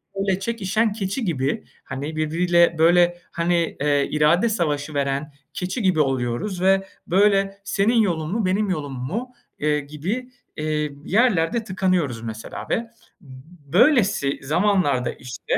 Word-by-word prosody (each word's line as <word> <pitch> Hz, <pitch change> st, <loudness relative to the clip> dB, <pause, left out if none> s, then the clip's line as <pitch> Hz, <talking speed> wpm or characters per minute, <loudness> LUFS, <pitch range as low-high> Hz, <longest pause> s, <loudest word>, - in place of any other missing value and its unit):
böyle 195 Hz, -1 st, 0 dB
çekişen 215 Hz, 0 st, 0 dB
keçi 210 Hz, +3 st, -3 dB
gibi, 140 Hz, -5 st, -1 dB, 0.2 s
hani, 140 Hz, +3 st, -5 dB
birbiriyle, 170 Hz, +2 st, +2 dB
böyle, 175 Hz, +2 st, +4 dB
hani, 170 Hz, -1 st, 0 dB
eee, 145 Hz, -1 st, +2 dB
irade 155 Hz, +9 st, +3 dB
savaşı 155 Hz, -7 st, -1 dB
veren 140 Hz, +1 st, -1 dB, 0.2 s
keçi 185 Hz, +6 st, -3 dB
gibi 185 Hz, -5 st, +2 dB
oluyoruz. 135 Hz, -, -1 dB
Ve 195 Hz, 0 st, +3 dB, 0.2 s
böyle, 195 Hz, +1 st, +3 dB
"Senin 210 Hz, +3 st, +1 dB
yolun 165 Hz, -5 st, -1 dB
mu, 220 Hz, -1 st, 0 dB
benim 195 Hz, +3 st, +1 dB
yolum 145 Hz, -6 st, -3 dB
mu?" 230 Hz, -, -4 dB, 0.3 s
eee, 150 Hz, 0 st, +1 dB
gibi, 175 Hz, -, -5 dB, 0.3 s
eee, 150 Hz, -1 st, -1 dB
yerlerde 220 Hz, -1 st, +2 dB
tıkanıyoruz 185 Hz, -, 0 dB
mesela 110 Hz, -1 st, -7 dB
ve -, -, +2 dB, 0.5 s
b 130 Hz, -2 st, -13 dB, 0.3 s
böylesi 205 Hz, -, +3 dB
zamanlarda 155 Hz, -5 st, +1 dB
işte 125 Hz, -1 st, -4 dB
175 Hz, 130 wpm, -22 LUFS, 150-195 Hz, 0.5 s, böyle